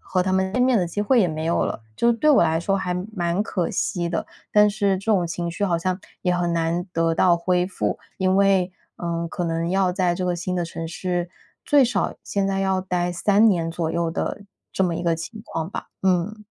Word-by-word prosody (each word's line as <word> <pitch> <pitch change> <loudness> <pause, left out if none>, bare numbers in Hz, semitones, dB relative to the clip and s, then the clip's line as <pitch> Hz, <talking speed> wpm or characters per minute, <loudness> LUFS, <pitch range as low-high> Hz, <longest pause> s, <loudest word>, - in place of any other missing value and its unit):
和 185 - -1
他 185 +1 -1
们 190 0 +1
见 250 - 0
面 255 -2 +4
的 180 - +1
机 175 +5 -3
会 240 +3 +4
也 180 - +3
没 155 0 -4
有 170 - +1
了。 - - -3 0.2
就 235 - +2
是 - - +5
对 305 +7 +1
我 285 - +6
来 160 +1 +2
说 195 +3 +1
还 180 -2 -2 0.2
蛮 175 +2 0
可 180 -5 -2
惜 175 -2 -1
的， 165 - -2 0.3
但 210 0 +6
是 200 -2 +1
这 195 - -12
种 180 -4 +2
情 170 +1 -3
绪 185 +4 -2
好 170 -3 +1
像 185 +2 -1 0.2
也 180 -1 +2
很 175 -1 0
难 170 +1 0
得 165 0 +1
到 175 +1 +4
恢 180 +1 +1
复， 190 - -2 0.2
因 185 0 +2
为， 195 -2 +3 0.3
呃， 170 -1 -3
可 175 - -3
能 165 +1 -1
要 190 -1 +2
在 180 -2 +1
这 185 - -4
个 180 -1 0
新 180 +1 -3
的 175 - 0
城 165 0 -6
市 175 +1 -3 0.3
最 290 -2 +5
少 235 -5 0
现 200 -1 -1
在 195 0 0
要 190 -1 +1
待 180 -1 -1
3 205 +5 +4
年 165 -4 +1
左 165 -1 -2
右 170 0 0
的 200 +4 -3 0.3
这 190 - +2
么 170 -2 0
一 - - -4
个 170 -1 +2
情 215 +6 -7
况 165 -2 -4
吧， - - -6
嗯。 190 +3 0
180 Hz, 250 characters per minute, -23 LUFS, 170-195 Hz, 0.3 s, 我